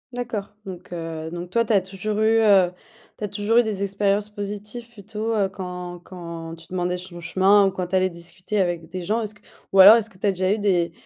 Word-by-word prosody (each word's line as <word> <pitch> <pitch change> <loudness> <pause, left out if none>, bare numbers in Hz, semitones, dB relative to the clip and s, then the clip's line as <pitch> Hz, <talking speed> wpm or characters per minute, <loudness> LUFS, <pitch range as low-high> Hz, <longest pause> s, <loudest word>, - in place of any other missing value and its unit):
D'accord. 240 -5 -4 0.2
Donc, 185 -2 -9
heu, 165 -2 -5
donc 175 +1 -7
toi, 230 +2 +3
tu 230 - -3
as 205 - +5
toujours 195 +3 -4
eu, 220 +1 +4
heu, 195 -4 +5 0.5
tu - - -8
as 210 - -2
toujours 215 +4 +2
eu - - +5
des 210 -3 -3
expériences 200 +1 0
positives 210 +3 -6
plutôt, 220 +1 -4
heu, 205 -3 +2
quand 180 -2 -7
quand 170 -3 -8
tu 165 0 -16
demandais 180 0 -1
son 180 -1 -9
chemin 190 +4 +4
ou 195 - +1
quand 180 -1 -4
tu 185 - -2
allais 185 0 +3
discuter 180 +4 -5
avec 175 -3 -1
des 185 0 -5
gens. 220 +6 0
Est-ce 215 -1 -5
que - - -22 0.3
ou 195 - +3
alors 200 +4 +11
est-ce 225 -1 0
que 190 - -19
tu 200 - -1
as - - +4
déjà 185 0 0
eu 215 - +1
des, 180 -5 +1
195 Hz, 240 wpm, -23 LUFS, 180-210 Hz, 0.5 s, alors